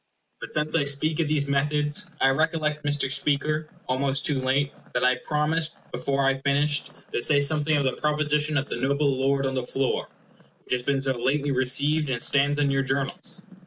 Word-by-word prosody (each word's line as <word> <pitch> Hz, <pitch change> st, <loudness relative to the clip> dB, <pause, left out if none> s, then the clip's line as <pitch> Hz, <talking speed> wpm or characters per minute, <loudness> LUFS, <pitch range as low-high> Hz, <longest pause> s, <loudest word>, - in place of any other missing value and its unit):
But -, -, -8 dB
since 155 Hz, +1 st, -1 dB
I 160 Hz, -, +3 dB
speak 150 Hz, +3 st, 0 dB
of 165 Hz, -, +1 dB
these 150 Hz, -2 st, 0 dB
methods, 150 Hz, +5 st, 0 dB
I 135 Hz, -, +4 dB
recollect, 155 Hz, +1 st, 0 dB
Mr. 145 Hz, -2 st, 0 dB
Speaker, 150 Hz, +2 st, 0 dB, 0.2 s
almost 135 Hz, +1 st, -1 dB
too 140 Hz, -2 st, 0 dB
late, 135 Hz, +2 st, +1 dB, 0.2 s
that -, -, +1 dB
I 125 Hz, 0 st, +3 dB
promised, 155 Hz, +3 st, 0 dB
before 140 Hz, 0 st, -1 dB
I 135 Hz, 0 st, +1 dB
finished, 145 Hz, +1 st, +1 dB, 0.2 s
to -, -, 0 dB
say 145 Hz, +3 st, +4 dB
something 150 Hz, +1 st, +2 dB
of 145 Hz, -, +1 dB
the 130 Hz, -, +1 dB
proposition 150 Hz, 0 st, 0 dB
of 140 Hz, 0 st, -1 dB
the -, -, -4 dB
noble 140 Hz, +2 st, +1 dB
lord 135 Hz, +1 st, +1 dB
on 135 Hz, -, -1 dB
the 130 Hz, -, -1 dB
floor, 135 Hz, +1 st, -1 dB, 0.6 s
which -, -, -2 dB
has 125 Hz, -, 0 dB
been 135 Hz, +1 st, 0 dB
so 135 Hz, -1 st, 0 dB
lately 140 Hz, +2 st, +1 dB
received 140 Hz, +4 st, +2 dB
and 125 Hz, -2 st, -1 dB
stands 140 Hz, +3 st, +2 dB
on 145 Hz, -1 st, +2 dB
your 135 Hz, 0 st, +2 dB
Journals. 140 Hz, +8 st, -2 dB
140 Hz, 195 wpm, -25 LUFS, 135-150 Hz, 0.6 s, I